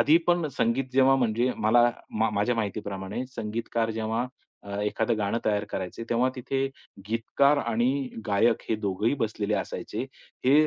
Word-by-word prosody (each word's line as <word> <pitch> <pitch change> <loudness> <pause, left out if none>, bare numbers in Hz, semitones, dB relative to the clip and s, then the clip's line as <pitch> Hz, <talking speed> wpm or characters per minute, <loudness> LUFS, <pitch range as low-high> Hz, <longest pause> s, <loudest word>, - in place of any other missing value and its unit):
आधी 155 +3 +6
पण 175 -2 +3
संगीत 125 0 +1
जेव्हा 135 0 +5
म्हणजे 120 +2 +2 0.2
मला 120 +2 +6 0.4
मा 110 - +3
माझ्या 110 +4 +2
माहितीप्रमाणे 100 0 -3
संगीतकार 115 -1 -2
जेव्हा 110 +3 -1 0.4
अ, 100 0 -5
एखादं 110 +2 0
गाणं 105 +2 0
तयार 105 -1 +1
करायचे, 95 +4 -4
तेव्हा 120 +2 +2
तिथे 135 +1 -1 0.4
गीतकार 140 +6 +2
आणि 120 -1 +1 0.4
गायक 110 +3 +3
हे 110 - +2
दोघंही 100 +5 +1
बसलेले 105 -1 -1
असायचे, - - -3 0.4
हे 130 - +5
115 Hz, 145 wpm, -27 LUFS, 105-125 Hz, 0.4 s, आधी